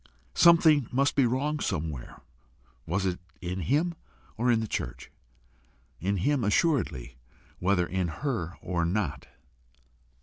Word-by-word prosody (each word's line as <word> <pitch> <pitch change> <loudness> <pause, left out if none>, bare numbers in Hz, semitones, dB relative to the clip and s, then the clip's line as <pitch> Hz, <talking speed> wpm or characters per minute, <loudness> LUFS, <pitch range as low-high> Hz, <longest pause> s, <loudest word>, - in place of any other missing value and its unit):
Something 160 -6 +6
must 140 +3 +2
be 135 -3 +4
wrong 145 +5 -1
somewhere: 75 - -4 0.7
was 95 +4 0
it 90 -2 -1 0.2
in 90 +1 -4
him 150 - +1 0.4
or 120 +2 0
in 115 -2 +4
the 110 - -3
church? - - -5 0.9
In 100 +3 0
him 140 +7 +1
assuredly, 100 - 0 0.4
whether 90 -1 +2
in 90 0 -1
her 90 - -3
or 90 -2 -1
not. 85 -6 -2
100 Hz, 125 wpm, -28 LUFS, 85-140 Hz, 0.9 s, Something